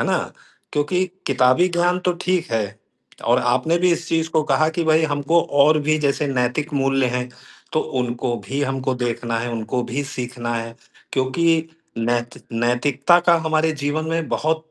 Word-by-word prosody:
है - - +1
ना? - - +2 0.6
क्योंकि 165 +6 +1 0.2
किताबी 130 +6 +4
ज्ञान 175 +1 +1
तो 180 - +3
ठीक 185 -1 0
है 115 -1 +1 0.7
और 120 - +5
आपने 125 +7 +1
भी 180 +1 +3
इस 170 0 -2
चीज़ 160 0 0
को 160 -1 +2
कहा 155 - +4
कि 170 - +1
भई 160 0 +4
हमको 145 +2 +2 0.2
और 155 +2 +5
भी 155 0 +3
जैसे 145 0 0
नैतिक 135 +3 -1
मूल्य 135 -1 +2
हैं, 125 0 -2 0.4
तो 155 - +2 0.2
उनको 120 0 -1
भी 140 +6 -2
हमको 135 -1 -1
देखना 120 -2 -2
है, 120 +1 -3
उनको 115 +2 -2
भी 140 +4 -1
सीखना 125 -3 -4
है 115 0 -4 0.4
क्योंकि 160 +5 +1 0.3
नैत 120 +1 -1 0.2
नैतिकता 125 +7 +2
का 170 - +8
हमारे 160 0 +2
जीवन 145 +2 -1
में 165 -1 -1
बहुत 160 +1 -1
140 Hz, 170 wpm, -21 LUFS, 125-160 Hz, 0.7 s, का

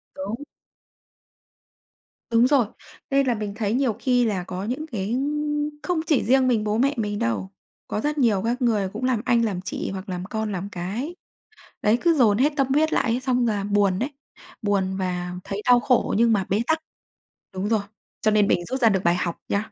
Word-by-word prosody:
Đúng. 205 +8 -5 1.9
Đúng 230 +2 +5
rồi, 270 -4 +4 0.4
nên 275 0 +2
là 245 - +2
mình 210 -2 -4
thấy 215 -1 -1
nhiều 250 -3 +1
khi 245 -1 +2
là 200 -5 -1
có 185 +1 -5
những 255 +9 -3
cái 215 +2 -1 0.7
không 355 -3 0
chỉ 300 -4 +3
riêng 260 +1 +3
mình 230 -4 +2
bố 210 0 0
mẹ 275 +4 +2
mình 205 -2 -2
đâu, 100 -5 -1 0.4
có 210 - -2
rất 300 +3 -1
nhiều 225 -8 +3
các 245 +3 -1
người 215 -6 +1
cũng 220 +4 -5
làm 255 -4 +1
anh, 235 -2 +3
làm 190 -5 -2
chị 190 - -4
hoặc 190 +1 -7
làm 180 0 -4
con, 220 +1 -3
làm 195 +1 -4
cái, 205 - -4 0.7
đấy, 215 +3 +3
cứ 340 -1 +3
dồn 225 -8 +4
hết 290 +5 +3
tâm 275 - +2
huyết 305 +4 +2
lại 240 - +2
ấy, 245 - 0
xong 250 -2 +1
là 205 -3 0
buồn 200 -2 +2
đấy, 255 +7 -1 0.5
buồn 195 -2 0
và 180 -1 -3
thấy 200 +1 -4
đau 245 -1 +6
khổ 250 -1 +2
nhưng 230 0 +4
mà 200 -3 +2
bế 200 +3 +1
tắc. 320 0 +2 0.8
Đúng 190 +2 -2
rồi, 220 -2 +2 0.4
cho 215 - +3
nên 210 -1 +4
mình 175 -3 +1
rút 260 +8 -3
ra 230 - +6
được 190 -2 0
bài 170 0 +3
học 175 -1 -2
nhá. 210 +2 -1
220 Hz, 205 wpm, -24 LUFS, 195-250 Hz, 1.9 s, đau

